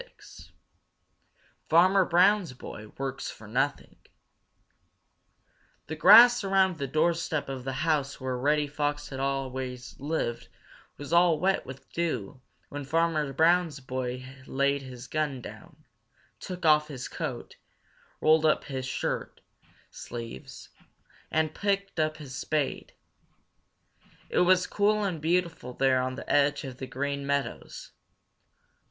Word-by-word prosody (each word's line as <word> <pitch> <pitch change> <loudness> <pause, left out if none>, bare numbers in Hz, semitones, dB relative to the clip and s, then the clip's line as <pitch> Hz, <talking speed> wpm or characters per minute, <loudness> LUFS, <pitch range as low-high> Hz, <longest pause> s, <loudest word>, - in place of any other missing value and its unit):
XXVI. - - -16 1.2
Farmer 185 +3 +5
Brown's 180 -2 +3
Boy 110 -3 -9
Works 135 -1 -4
for 110 - -11
Nothing 135 +6 -2 1.9
The 160 - -5
grass 230 +8 +8
around 190 -3 +2
the 140 - -2
doorstep 160 +1 0
of 130 -2 -6
the 135 - -3
house 145 -3 0
where 130 -1 -3
Reddy 150 +4 +1
Fox 145 0 -3
had 135 - -6
always 130 -2 -3
lived 140 -5 -3 0.5
was 145 +2 -7
all 170 -2 +5
wet 190 -3 +1
with 130 +1 -10
dew 135 -7 -3 0.3
when 145 0 -6
Farmer 155 0 0
Brown's 160 +1 +2
boy 130 -1 -4 0.2
laid 140 +1 +1
his 125 -2 -9
gun 150 -1 -2
down, - - -12 0.5
took 180 -2 -6
off 150 -1 +5
his 130 -4 -6
coat, - - -6 0.6
rolled 155 0 +4
up 155 -1 +3
his 130 -2 -5
shirt - - -3 0.5
sleeves, 115 - -9 0.6
and 155 0 0
picked 200 -3 -1
up 155 0 0
his 140 -3 -9
spade. 150 0 -2 1.3
It - - +1
was 185 +1 +4
cool 210 +1 +1
and 180 -6 -2
beautiful 165 -6 -1
there 130 0 +2
on 130 0 -3
the - - -9
edge 145 +1 +2
of 130 -3 -7
the 130 - -5
Green 140 +2 -3
Meadows. 140 0 -3
145 Hz, 125 wpm, -28 LUFS, 130-170 Hz, 1.9 s, grass